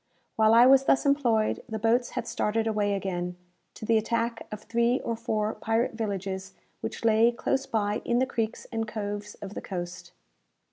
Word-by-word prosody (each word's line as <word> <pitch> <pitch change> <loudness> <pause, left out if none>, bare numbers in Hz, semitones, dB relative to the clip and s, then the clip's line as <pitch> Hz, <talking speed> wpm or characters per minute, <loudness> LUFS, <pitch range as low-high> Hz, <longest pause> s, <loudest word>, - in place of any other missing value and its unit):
While 220 0 +5
I 235 +1 +8
was 270 +1 +6
thus 270 - +3
employed, 245 -6 +2
the 220 - -3
boats 230 +3 +2
had - - -1
started 220 +1 0
away 210 -2 +1
again, 180 -2 -3 0.4
to - - -7
the 225 0 +4
attack 230 +1 -2
of 210 0 -7
three 235 +2 +1
or 230 - -2
four 220 -2 -1
pirate 225 +3 0
villages 195 -3 -4 0.2
which - - -5
lay 225 +1 +5
close 270 +3 -1
by 210 -2 0
in 240 - +1
the 260 - +3
creeks 225 -4 -3
and 225 -1 -2
coves 205 -1 -5
of 200 0 -7
the - - -5
coast. 175 -1 -6
220 Hz, 180 wpm, -27 LUFS, 205-235 Hz, 0.4 s, I